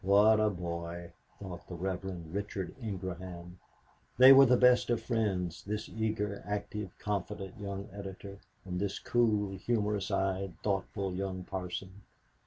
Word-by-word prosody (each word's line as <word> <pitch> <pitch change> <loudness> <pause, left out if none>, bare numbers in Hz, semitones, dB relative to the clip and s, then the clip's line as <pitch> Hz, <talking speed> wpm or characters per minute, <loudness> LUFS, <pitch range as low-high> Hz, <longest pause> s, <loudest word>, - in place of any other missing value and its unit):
"What 105 +3 +6
a 110 0 +4
boy!" 85 -2 -5 0.3
thought 95 -3 -8
the 90 - -6
Reverend 90 -2 -4
Richard 100 -2 -3
Ingraham. 90 -4 -6 0.6
They 130 +2 +11
were 135 0 +9
the 125 0 +5
best 125 -1 +5
of 120 -2 +2
friends, 95 -8 -1
this 105 +2 -3
eager, 105 -2 -2
active, 105 0 -3
confident 100 0 -4
young 100 -1 -5
editor 100 0 -8 0.3
and 90 -1 -3
this 100 0 -1
cool, 105 -5 +1
humorous 105 -3 0
eyed, 95 -2 -1
thoughtful 100 -1 -1
young 95 0 -3
parson. 95 +1 -5
100 Hz, 135 wpm, -32 LUFS, 95-105 Hz, 0.6 s, They